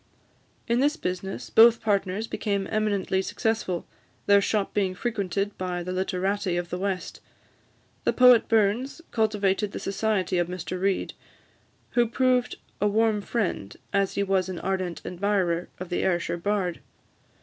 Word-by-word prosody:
In 235 +1 +2
this 295 +4 +2
business, 185 - -4
both 230 +1 +7
partners 200 0 0
became 200 -3 -2
eminently 205 -3 0
successful, 205 -4 -2 0.4
their 200 0 +6
shop 205 0 0
being 190 -3 0
frequented 200 -2 -2
by 180 -1 -2
the 180 - -4
literati 190 0 -1
of 175 -1 -4
the 180 - -3
West. 195 -1 -3 0.8
The - - +2
poet 250 -2 +6
Burns 225 +8 +1
cultivated 210 -2 +1
the - - -4
society 195 -3 0
of 175 - +1
Mr 180 0 -5
Reid, 195 0 0 0.8
who 240 -1 +3
proved 250 +1 +1 0.3
a 210 - +4
warm 215 0 +2
friend, 200 - -3 0.2
as 195 -1 +1
he 200 - +1
was 190 -1 +1
an 185 - -4
ardent 185 -3 -3
admirer, 180 -2 0
of 185 -1 -6
the 175 - -1
Ayrshire 175 -2 0
bard. 185 -2 -1
200 Hz, 145 wpm, -26 LUFS, 185-220 Hz, 0.8 s, both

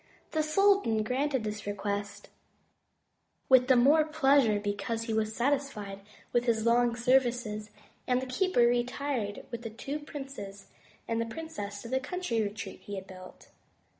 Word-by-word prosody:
The 315 - +1
sultan 310 - +3
granted 265 +2 0
this 210 -1 -5
request, 205 0 -4 1.2
with 255 -1 +6
the 260 - +6
more 285 +6 +6
pleasure 280 -8 +3
because 205 +3 -2
he 225 -1 -3
was 220 0 0
satisfied 245 -7 -1 0.3
with 240 0 +2
his 225 -2 +1
long 235 0 +3
services, 240 -3 +1 0.4
and 250 0 +3
the 260 - -4
keeper 365 +3 +1
retired 240 -2 0
with 235 -1 -5
the 230 - -5
two 275 +7 -5
princes 270 -10 -8 0.4
and 230 0 0
the 230 - -2
princess 225 -8 -6
to - - -7
the 260 +2 0
country 275 -5 -2
retreat 205 0 -5
he 205 - -7
had 190 -1 -6
built. 185 -1 -13
235 Hz, 150 wpm, -30 LUFS, 210-275 Hz, 1.2 s, with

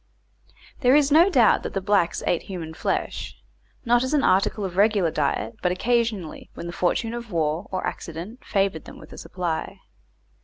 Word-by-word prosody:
There 255 -1 +4
is 290 -1 +4
no 335 +6 +6
doubt 245 - +4
that - - -6
the - - +1
blacks 195 -3 +1
ate 175 - +1
human 170 -4 -7
flesh, - - -3 0.5
not 240 +1 +3
as 260 +3 0
an 285 - +2
article 195 +2 +2
of 180 -2 -5
regular 200 -4 +3
diet, 130 -7 -1
but 180 - +1
occasionally, 225 -4 -1
when - - -7
the 170 - -6
fortune 225 +6 0
of 235 -2 -7
war, 160 +2 -1
or 185 -1 -2
accident, 175 +10 -6
favoured 195 -5 -1
them - - -11
with - - -13
a - - -11
supply. 175 -3 -4
195 Hz, 180 wpm, -24 LUFS, 170-235 Hz, 0.5 s, no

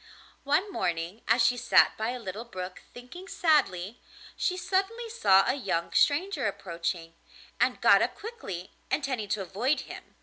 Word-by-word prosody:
One 315 +9 +1
morning 175 - -2
as 230 +2 +4
she 250 - +3
sat - - +4
by 220 +1 -2
a 250 - -3
little 215 -1 -6
brook, 185 -6 -7
thinking 260 +10 -11
sadly, 245 - +1 0.3
she 365 - -1
suddenly 390 +6 -1
saw 195 - +4
a - - +3
young 190 -11 -2
stranger 340 - +2
approaching, 170 -3 -4 0.5
and - - +2
got - - +6
up - - 0
quickly, 415 - -7 0.2
intending 260 -8 -2
to 205 -1 -1
avoid 230 - 0
him. - - -11
240 Hz, 155 wpm, -28 LUFS, -, 0.5 s, got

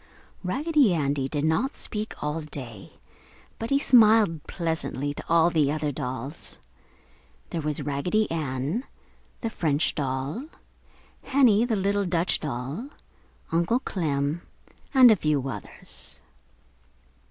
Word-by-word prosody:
Raggedy 275 - +2
Andy 140 -3 0
did 145 +1 -1
not 215 - +1
speak 215 -1 -5
all 150 +2 -1
day, 125 -9 -7 0.7
but 225 - -4
he 275 - +4
smiled 220 - +5
pleasantly 160 -5 -2
to - - -7
all 170 +1 +5
the 150 -4 +2
other 150 -1 -1
dolls. 130 +4 -5 0.9
There 165 - -2
was 150 -1 -1
Raggedy 150 +10 +1
Ann, 150 - -2 0.6
the 230 - -2
French 150 -5 +1
doll, 140 - -3 0.8
Henny, 240 -5 +4
the 235 -2 0
little 200 0 +1
Dutch 175 0 +1
doll, 145 - -4 0.6
Uncle 170 +8 +2
Clem, 150 - -1 0.5
and 255 -4 +8
a - - +6
few 150 -6 0
others. 105 -7 -6
160 Hz, 120 wpm, -26 LUFS, 145-215 Hz, 0.9 s, and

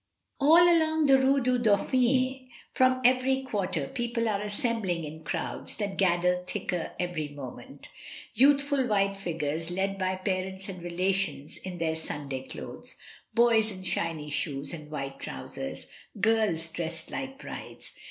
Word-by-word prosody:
All 320 +5 +7
along 315 -2 +3
the 270 -1 +6
Rue 270 +1 +3
du 250 0 +2
Dauphin, 255 +4 +2 0.2
from 255 0 +3
every 260 +1 +3
quarter 190 - -1
people 235 - -1
are 205 -2 0
assembling 205 -4 -1
in 160 +1 -9
crowds - - -3
that 200 -3 -3
gather 180 -1 +3
thicker 175 -2 -3
every 175 -4 -2
moment 140 -3 -10 0.2
— - - -10
youthful 280 +1 +4
white 195 -2 +2
figures 165 -4 -3
led 195 +2 -1
by 185 0 0
parents 190 0 -2
and 185 -2 -7
relations 175 -4 0
in 185 -2 -7
their 160 -1 0
Sunday 145 -4 -4
dothes, 130 - -8 0.4
boys 230 -2 +4
in 185 -1 -9
shiny 165 -4 -1
shoes 145 0 -1
and 155 -3 -8
white 135 -2 -5
trousers, 65 0 -6 0.3
girls 215 -7 +2
dressed 165 -1 -4
like 270 0 -5
brides. - - -8
195 Hz, 140 wpm, -28 LUFS, 165-250 Hz, 0.4 s, All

